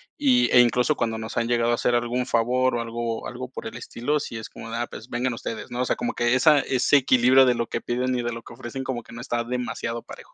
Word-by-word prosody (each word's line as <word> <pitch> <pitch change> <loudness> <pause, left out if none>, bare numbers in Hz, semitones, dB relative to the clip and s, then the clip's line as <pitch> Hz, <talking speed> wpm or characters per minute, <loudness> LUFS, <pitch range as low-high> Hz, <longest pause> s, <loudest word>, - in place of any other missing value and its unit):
y 260 -4 +3
e 125 - +7
incluso, 125 +4 +2
cuando 115 -3 -1
nos 110 +1 -6
han 115 -1 +1
llegado 120 0 +2
a - - +3
hacer, 120 +1 +1
algún 120 +1 -1
favor, 125 +2 +2
o 120 - -1
algo-algo 115 +2 -4
por - - -8
el - - -6
estilo, 120 +4 -2
sí 120 -5 -6
es 110 - -7
como 115 - -9
de: 115 - -4
"Ah, 120 - -1
pues 110 +4 -11
vengan 125 +1 -1
ustedes", 115 -1 -6
¿no? 120 +1 -2
O - - +1
sea, - - 0
como 240 +1 -3
que 120 +1 +2
esa 150 +3 +5
Ese 135 +1 +3
equilibrio 130 0 +5
de 125 - +3
lo 120 - -1
que - - -3
piden, 125 +1 -1
y 125 - 0
de 120 0 -2
lo 115 0 -7
que - - -12
ofrecen, 120 +2 -6
como 130 -2 -3
que, - - -17
no 115 - -7
está 120 -2 -2
demasiado 120 -1 -4
parejo. - - -13
120 Hz, 275 wpm, -24 LUFS, 115-130 Hz, -, e